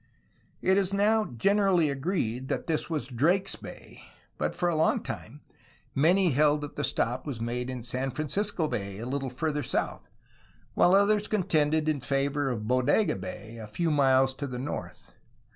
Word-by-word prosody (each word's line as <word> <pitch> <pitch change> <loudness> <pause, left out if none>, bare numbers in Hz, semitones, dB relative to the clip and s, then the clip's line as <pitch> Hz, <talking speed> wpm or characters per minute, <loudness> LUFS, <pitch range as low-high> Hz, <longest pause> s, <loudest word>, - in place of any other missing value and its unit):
It 190 +1 +4
is 190 -1 0
now 215 +2 +3
generally 185 - +2
agreed 135 - -2
that - - -2
this 160 -1 -1
was 155 -7 -2
Drake's 160 +10 +1
Bay, - - -11 0.4
but - - -1
for 175 - 0
a 170 - +1
long 155 +1 +2
time - - -7 0.5
many 175 +5 +4
held 150 +2 +3
that 145 - -7
the 145 - -2
stop 125 0 -1
was 130 -6 -4
made 120 +2 -3
in 125 -2 -5
San 130 +3 -2
Francisco 160 - -1
Bay, 100 -7 -4
a 115 - -6
little 135 +1 -2
farther 150 +4 -2
south, - - -2 0.7
while 180 - +5
others 205 +1 +3
contended 155 -6 +1
in 150 -3 0
favor 140 +2 0
of 110 -4 -3
Bodega 130 - +2
Bay, 110 +5 -7
a 110 - -7
few 160 +10 -1
miles 135 -2 +4
to 140 +2 -5
the 125 -2 -5
north. 135 +4 -6
145 Hz, 170 wpm, -28 LUFS, 125-175 Hz, 0.7 s, while